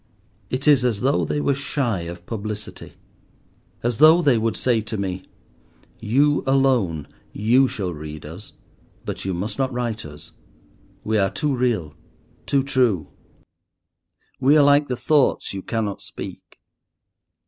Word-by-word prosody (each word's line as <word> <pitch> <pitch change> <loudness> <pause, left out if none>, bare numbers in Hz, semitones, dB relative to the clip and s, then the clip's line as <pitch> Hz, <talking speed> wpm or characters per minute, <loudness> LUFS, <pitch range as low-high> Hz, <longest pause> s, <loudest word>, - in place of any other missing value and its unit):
It 130 +3 -2
is 140 -4 +6
as 115 -5 0
though 135 +3 +2
they 150 - -1
were 140 -1 +1
shy 135 -6 -1
of 85 0 -9
publicity, 105 -1 -6 0.9
as 120 -2 -1
though 160 +3 +8
they 140 -5 +4
would 115 0 0
say 120 -3 +1
to 110 +1 -5
me—"You 115 +7 -3
alone, 125 - +2 0.3
you 125 +6 +3
shall 95 -7 -4
read 75 -1 -8
us, 85 +8 -10 0.5
but - - -5
you 95 -2 -1
must 100 +9 -4
not 130 -1 +1
write 120 -3 -3
us; 75 -1 -12 0.7
we 110 0 +1
are 95 -1 +2
too 145 +5 -1
real, 115 -12 -1 0.5
too 140 -1 +2
true. 125 - +1 1.3
We 140 +3 +5
are 145 - +6
like 145 +1 +4
the 125 - -3
thoughts 145 -6 +1
you 95 - -5
cannot 105 -1 -3
speak. - - -9
115 Hz, 140 wpm, -22 LUFS, 100-135 Hz, 1.3 s, though